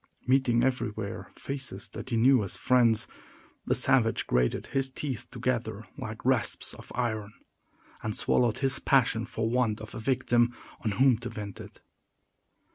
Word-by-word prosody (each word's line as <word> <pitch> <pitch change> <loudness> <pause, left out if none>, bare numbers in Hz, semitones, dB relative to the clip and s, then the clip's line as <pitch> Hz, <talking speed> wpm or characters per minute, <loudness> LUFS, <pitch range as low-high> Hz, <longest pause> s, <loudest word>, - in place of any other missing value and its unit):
Meeting 125 -2 +3
everywhere 110 -5 -2
faces 130 -7 -5
that 120 - -8
he 115 - 0
knew 125 0 +5
as 100 - -3
friends, 120 -3 +3 0.6
the - - +2
savage - - +3
grated 60 0 +1
his 135 -1 0
teeth 130 -4 -4
together 120 -4 -2
like - - -7
rasps - - +1
of - - -13
iron, 110 -4 -2 0.7
and 110 -1 -3
swallowed 120 -3 +2
his 135 -2 +3
passion 120 -4 +2
for 110 0 -2
want 115 -2 +1
of 110 0 -9
a - - -6
victim 120 -1 +2 0.3
on 110 -3 0
whom 130 0 +4
to 120 0 -5
vent 105 -4 -7
it. - - -13
120 Hz, 150 wpm, -28 LUFS, 110-130 Hz, 0.7 s, knew